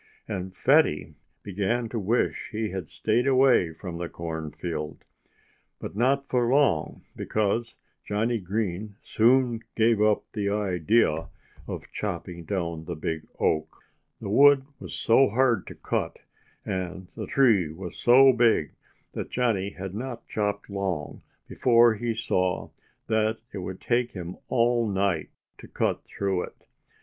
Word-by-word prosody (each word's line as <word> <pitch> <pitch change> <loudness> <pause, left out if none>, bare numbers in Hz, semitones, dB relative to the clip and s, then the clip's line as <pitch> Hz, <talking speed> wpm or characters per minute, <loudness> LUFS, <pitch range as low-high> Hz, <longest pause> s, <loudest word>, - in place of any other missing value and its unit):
And 95 -3 -5
Fatty 135 - +3 0.3
began 105 +5 -1
to 115 - -3
wish 110 +5 0
he 110 -1 -2
had 95 -4 -5
stayed 115 +4 0
away 130 -10 +4
from 85 +1 -7
the 85 - -4
cornfield. 80 -1 -5 0.7
But - - -7
not 135 +5 +1
for 120 -2 +1
long, 135 - +2
because 110 +2 -1 0.3
Johnnie 110 +3 0
Green 100 +1 -3
soon 120 0 +3
gave 110 -1 +3
up 105 -1 +3
the 100 -2 -1
idea 95 -3 +1 0.4
of - - -7
chopping 85 -1 -5
down 85 -4 -3
the 85 - -4
big 80 0 -4
oak. 80 0 -1 0.4
The - - -6
wood 140 +3 +6
was - - -7
so 130 +4 +4
hard 120 -2 +2
to - - -9
cut, - - -2 0.5
and 95 0 -4
the 110 - -5
tree 110 - +3
was 90 +2 -8
so 130 +2 +6
big, 115 -10 +3 0.4
that - - -5
Johnnie 110 -6 0
had 95 0 -6
not 120 +2 -6
chopped 105 -1 -2
long 95 -6 -3 0.3
before 120 -2 +4
he 115 +1 -2
saw 95 -5 -1 0.3
that 110 0 +1 0.2
it 100 - -4
would 95 0 -6
take 120 0 0
him 90 -1 -7
all 120 -1 +2
night 95 -4 0 0.3
to - - -11
cut - - -1
through 95 -2 -1
it. - - -18
105 Hz, 140 wpm, -26 LUFS, 90-120 Hz, 0.7 s, wood